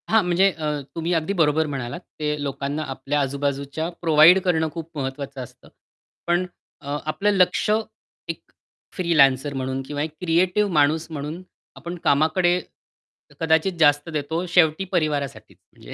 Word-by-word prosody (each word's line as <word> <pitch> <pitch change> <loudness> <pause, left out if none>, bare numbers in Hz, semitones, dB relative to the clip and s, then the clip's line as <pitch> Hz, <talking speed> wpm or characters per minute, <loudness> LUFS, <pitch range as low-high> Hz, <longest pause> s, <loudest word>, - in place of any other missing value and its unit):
हां, 220 -1 +4
म्हणजे 180 +3 +3
अ, 150 -3 -3
तुम्ही 165 +1 -1
अगदी 165 +3 0
बरोबर 160 -3 +2
म्हणालात, 130 -2 -5 0.2
ते 150 -1 -1
लोकांना 140 +2 -3
आपल्या 135 +3 -2
आजूबाजूच्या 140 +3 -2
प्रोव्हाईड 165 +2 +7
करणं 160 -3 +1
खूप 165 -1 -8
महत्वाचं 135 0 -5
असतं. 125 - -15 0.6
पण 175 +1 +2 0.4
अ, 145 0 -3
आपलं 155 +7 0
लक्ष 190 +1 +2 0.6
एक - - -5 0.5
फ्रीलॅन्सर 145 -6 +3
म्हणून 130 0 -3
किंवा 145 -1 -3
एक 155 - -4
क्रिएटिव्ह 180 +4 +2
माणूस 155 +2 +2
म्हणून 155 +3 -5 0.3
आपण 170 +6 -7
कामाकडे 160 +5 +3 0.8
कदाचित 160 +3 +2
जास्त 145 0 +4
देतो 160 +4 -2
शेवटी 165 +1 +4
परिवारासाठीच 140 - -2 0.2
म्हणजे - - -12
155 Hz, 135 wpm, -23 LUFS, 140-170 Hz, 0.8 s, प्रोव्हाईड